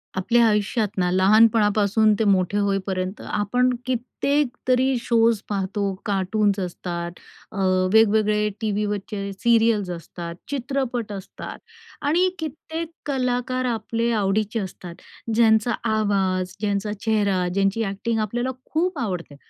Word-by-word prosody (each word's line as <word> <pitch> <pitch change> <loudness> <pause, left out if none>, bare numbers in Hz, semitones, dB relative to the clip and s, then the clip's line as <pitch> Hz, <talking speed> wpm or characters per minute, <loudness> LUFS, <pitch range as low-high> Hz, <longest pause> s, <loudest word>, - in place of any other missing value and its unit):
आपल्या 235 +5 +3
आयुष्यात 210 +1 +1
ना, 180 -1 +2
लहानपणापासून 210 +2 +4
ते - - +3
मोठे 195 -1 +2
होईपर्यंत 195 -1 -1
आपण 245 +5 +1 0.2
कित्येक 260 +3 0 0.2
तरी 260 +1 +3
शोज 230 -2 +2
पाहतो. 200 0 -1
कार्टून्स 200 0 +1
असतात, 175 -1 -4 0.4
अ, - - -9 0.4
वेगवेगळे 215 -1 +4
टीव्हीवरचे 205 -1 -2
सीरियल्स 225 -1 +2
असतात, 170 0 -7
चित्रपट 255 -4 -2
असतात 195 -1 -8 0.4
आणि 345 +6 +2
कित्येक 320 +1 -5
कलाकार 255 -2 -1
आपले 230 -1 -1
आवडीचे 215 +1 0
असतात. 180 -3 -7 0.4
ज्यांचा 220 +1 +4 0.2
आवाज, 190 -4 0
ज्यांचा 205 0 -1
चेहरा, 200 -5 +1
ज्यांची 195 +3 +1
एक्टिंग 225 +3 -2
आपल्याला 240 +4 -1
खूप 360 +4 -1
आवडते 180 -9 -4
215 Hz, 110 wpm, -23 LUFS, 195-235 Hz, 0.4 s, लहानपणापासून